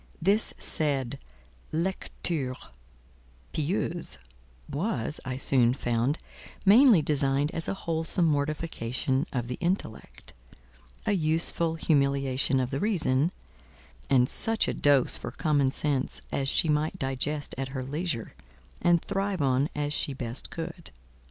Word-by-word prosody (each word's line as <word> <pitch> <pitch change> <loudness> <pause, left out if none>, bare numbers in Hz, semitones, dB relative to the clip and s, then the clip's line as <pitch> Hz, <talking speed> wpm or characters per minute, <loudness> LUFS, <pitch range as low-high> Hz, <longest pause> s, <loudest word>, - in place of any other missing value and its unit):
This 200 +6 +3
said 140 -4 +1 0.5
"lecture 165 -5 -2 1.0
pieuse" 165 +1 -2 0.5
was, 150 - -2
I 130 -1 -3
soon 125 -3 +3
found, 120 +4 0 0.5
mainly 215 - +7
designed 140 0 +1
as 165 - -3
a - - -1
wholesome 165 0 0
mortification 145 -3 -1
of 125 -3 -2
the 125 - -5
Intellect, 175 - -3 0.7
a - - +2
useful 165 -1 +1
humiliation 140 -3 +1
of 130 0 -1
the 135 - -1
Reason; 165 -7 +1 0.8
and 125 -2 +4
such 225 +9 +2
a - - 0
dose 140 -3 +3
for - - -6
Common 145 -4 +1
Sense 140 -2 -1
as 135 0 -1
she 165 - +2
might 150 +1 +1
digest 140 +3 -2
at 135 - -2
her 130 -1 -4
leisure, 145 -3 -3 0.5
and 175 -1 +3
thrive 195 -4 -1
on 135 +2 +2
as 145 0 -1
she 145 - 0
best 125 -1 -4
could. 170 +1 -5
145 Hz, 125 wpm, -28 LUFS, 135-165 Hz, 1.0 s, mainly